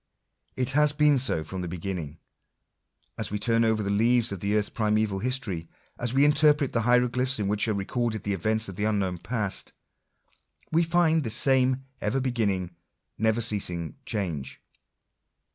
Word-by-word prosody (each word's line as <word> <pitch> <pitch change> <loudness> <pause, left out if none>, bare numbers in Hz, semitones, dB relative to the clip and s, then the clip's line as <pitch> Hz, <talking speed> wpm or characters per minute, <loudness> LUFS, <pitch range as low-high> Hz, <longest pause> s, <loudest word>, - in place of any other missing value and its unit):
It 130 0 0
has 150 +1 +3
been 150 -2 +4
so 120 -11 0
from 95 +3 -6
the 90 - -4
beginning. 85 -3 -5 1.0
As - - -2
we 105 - -2
turn 115 +2 +2
over 110 -1 +1
the 100 - -1
leaves 115 +3 +3
of 100 - -4
the 100 +3 0
earth's 105 -1 0
primeval 105 -2 0
history 110 -9 -2
— - - -36
as 120 -1 -2
we 135 +3 +4
interpret 150 -1 +4
the 115 - +1
hieroglyphics 125 +2 +2
in 105 -2 -1
which 105 +2 0
are 110 - 0
recorded 110 +2 -2
the 100 - -1
events 110 +4 0
of 95 -2 -8
the 105 - 0
unknown 95 -5 0
past, 105 -2 -2 1.0
we 165 - +3
find 165 -2 +2
this 110 -3 -2
same 130 0 +2 0.2
ever 105 +6 0
beginning, 105 -9 -1 0.5
never 110 +1 +2
ceasing 90 -7 -2
change. 90 - -4
110 Hz, 165 wpm, -26 LUFS, 100-130 Hz, 1.0 s, been